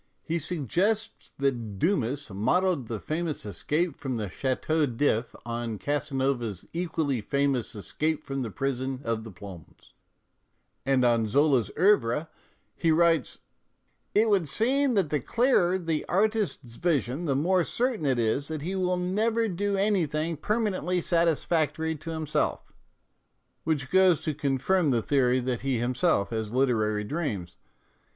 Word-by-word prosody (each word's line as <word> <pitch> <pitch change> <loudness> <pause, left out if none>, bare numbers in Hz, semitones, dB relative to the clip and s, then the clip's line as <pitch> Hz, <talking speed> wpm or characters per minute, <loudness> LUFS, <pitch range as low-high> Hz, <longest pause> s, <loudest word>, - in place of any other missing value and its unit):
He 170 +1 -1
suggests 180 - -1
that 120 -7 -1
Dumas 140 - 0
modelled 140 - +1
the 110 -2 -4
famous 155 0 -3
escape 150 - -1
from 130 -3 -4
the 105 -4 -3
Chateau 145 +4 0
d'lf 120 -2 0
on 115 -2 -3
Casanova's 130 - -1
equally 160 -7 -1
famous 140 0 0
escape 155 +9 -2
from 135 -1 -4
the 120 - -3
prison 130 +2 -3
of 115 -2 -2
the 110 - -8
Plombs, 90 -3 -12 0.9
and 130 -2 +3
on 115 -2 +3
Zola's 135 0 +3
" - - -18
CEuvre 155 - +3 0.3
" - - -43
he 165 - +3
writes: 165 -4 +2 0.4
" - - -46
It 215 +2 +5
would 195 -7 +2
seem 255 - +1
that 185 -7 +1
the 150 - +2
clearer 190 - +2
the 165 -4 -2
artist's 200 - 0
vision 155 -2 0
the 140 -4 +1
more 180 +6 +2
certain 235 - -1
it 130 -2 +2
is 120 +5 0
that 155 -2 -5
he 180 +4 -3
will 180 -1 0
never 220 +6 +1
do 200 +1 -1
anything 165 -6 +1
permanently 190 0 0
satisfactory 160 -1 +1
to 160 +3 -8
him 160 -1 -3
self," - - -1 0.9
which 145 -4 -1
goes 185 -3 +5
to 155 - -1
confirm 145 +5 +1
the 120 -4 +1
theory 130 -3 +2
that 125 -1 -2
he 135 -2 0
himself 120 - +1
has 110 -2 -3
literary 110 -5 +1
dreams. 105 - -3
145 Hz, 145 wpm, -27 LUFS, 125-175 Hz, 0.9 s, It